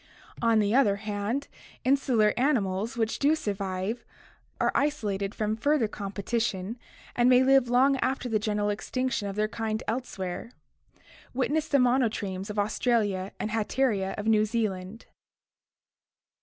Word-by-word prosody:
On 230 -1 +4
the 210 0 +2
other 245 -6 +4
hand, 210 +6 -3 0.4
insular 255 -5 +3
animals 230 -4 0
which 225 -1 -1
do 295 +3 +4
survive 200 -1 -3 0.6
are - - +2
isolated 210 -9 -1
from 215 0 -1
further 270 +1 +2
competition 205 +1 -3 0.4
and 240 +1 +4
may 255 0 +6
live 265 -2 +4
long 265 +3 +4
after 260 -1 -1
the 220 -3 +1
general 210 -1 0
extinction 255 +1 -2
of 195 - -5
their 215 0 +1
kind 220 0 -3
elsewhere. 225 -2 -4 0.8
Witness 295 +4 0
the 285 - +3
monotremes 230 -7 +1
of 210 - -5
Australia 205 -2 0
and 215 - -3
Hatteria 215 -3 0
of 210 - -4
New 215 -1 +4
Zealand. 215 -2 -3
220 Hz, 130 wpm, -27 LUFS, 205-250 Hz, 0.8 s, may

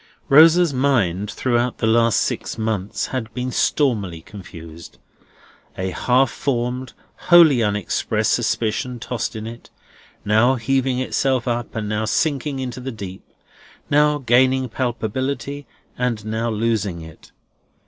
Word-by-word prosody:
Rosa's 165 +2 +6
mind 110 -8 +1
throughout 120 +1 -1
the - - -1
last 115 0 +3
six - - -3
months 110 -3 -2
had 120 -3 -3
been 125 0 -3
stormily 105 - 0
confused. 85 -4 -12 0.8
A 95 0 -2
half 125 +6 +2
formed, 125 -1 -3 0.4
wholly 165 -8 +7
unexpressed 105 -3 0
suspicion 120 +2 -1
tossed 120 0 -4
in 110 0 -6
it, 115 +1 -10 0.6
now 110 +5 +3
heaving 130 +2 0
itself 130 -1 0
up, 120 -1 -3
and 110 -2 -3
now 105 +1 -1
sinking 140 +2 -1
into 130 -1 -5
the 130 +1 -5
deep; 100 -4 -8 0.7
now 150 +1 +4
gaining 130 0 +2
palpability, 130 +3 -3 0.3
and 120 -4 -1
now 110 +2 -2
losing 105 -5 -1
it. 80 0 -14
120 Hz, 125 wpm, -21 LUFS, 110-130 Hz, 0.8 s, wholly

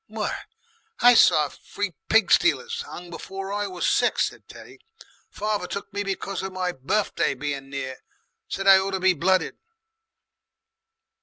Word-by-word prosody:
"Why! - - -3 0.7
I 245 +1 +8
saw 155 -9 +5
free 205 +6 -5 0.2
pig 220 -5 +4
stealers 470 +6 +2
'ung 175 - -9
before 195 +3 -6
I 205 0 -1
was 180 -2 -2
six," - - +2
said - - -18
Teddy. - - -13 0.5
"Father 210 -3 -2
took 200 0 -6
me 205 - -2
because 195 -1 -3
of 190 0 -5
my 185 -1 -1
birfday 175 +2 -1
being 140 0 -4
near. 130 -2 -5 0.5
Said 195 - -4
I 195 -1 +8
ought 190 +1 -2
to - - -7
be 185 0 +4
blooded...." 185 +3 +1
190 Hz, 150 wpm, -24 LUFS, 175-205 Hz, 0.7 s, I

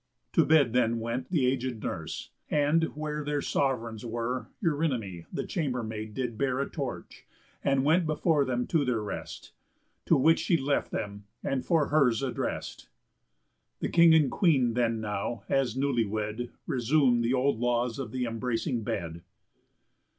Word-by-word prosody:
To - - +5
bed 145 -7 +4
then 115 -2 +2
went 120 +3 -3
The 155 -8 +2
aged 125 -3 -1
nurse; - - -5 0.2
and, 150 +3 +3
where 150 0 -3
their 145 0 -1
sov'reigns 115 -5 -1
were, 120 +2 -3 0.2
Eurynomé, 130 - -1
the - - -3
chambermaid, 110 - -3
did 125 -4 -3
bear 130 -1 +1
A 140 - 0
torch, 140 -4 -6 0.4
and 135 -1 +2
went 165 +3 +3
before 155 -1 +2
them 125 -2 -1
to 160 -4 +1
their 120 -5 0
rest; 105 - -7 0.6
To - - +5
which 160 +5 +4
she 170 - +2
left 140 0 0
them 100 -2 -5 0.2
and 130 -2 -1
for 160 0 +2
her's 140 -5 +3
addrest. 130 - -4 0.9
The - - -2
King 170 -1 +6
and 150 -5 +4
Queen 135 - +3
then 115 -2 +1
now, 105 +2 -3
as 130 -3 +1
newly 135 -4 +1
wed, 110 +3 -3 0.2
Resum'd 125 -1 +3
the 120 +3 +2
old 130 -2 +1
laws 120 0 0
of 135 - -5
th' 130 -1 -1
embracing 115 +2 -2
bed. 85 -7 -4
125 Hz, 155 wpm, -28 LUFS, 115-145 Hz, 0.9 s, King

